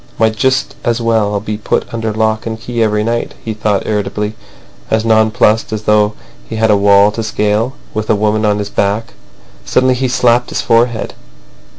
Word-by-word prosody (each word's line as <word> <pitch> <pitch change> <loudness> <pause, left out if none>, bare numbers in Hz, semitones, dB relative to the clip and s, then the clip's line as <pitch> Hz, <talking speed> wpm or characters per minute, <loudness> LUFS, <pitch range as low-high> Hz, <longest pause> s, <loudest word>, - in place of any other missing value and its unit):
"Might 110 -1 +2
just 130 +2 0
as 120 -1 0
well 110 -3 +1
be 105 0 -5
put 110 - -2
under 115 -1 -2
lock 110 +1 -1
and 110 0 -4
key 120 +1 -3
every 105 -1 +1
night," 115 +1 -2
he 110 - -2
thought 105 -2 -1
irritably, 105 0 -2 0.6
as 110 0 +1
nonplussed 110 0 +2
as 110 -1 -3
though 105 0 +3 0.4
he 115 - -4
had 110 0 +2
a - - +5
wall 100 0 +5
to 115 - -4
scale 110 +3 -1 0.2
with 110 0 -3
the 110 - +3
woman 105 +1 0
on 105 -1 +2
his 105 0 -4
back. 105 +3 -1 0.5
Suddenly 130 - +2
he 130 +1 -1
slapped 120 -1 +2
his - - -3
forehead. 115 0 +1
110 Hz, 185 wpm, -14 LUFS, 105-115 Hz, 0.6 s, a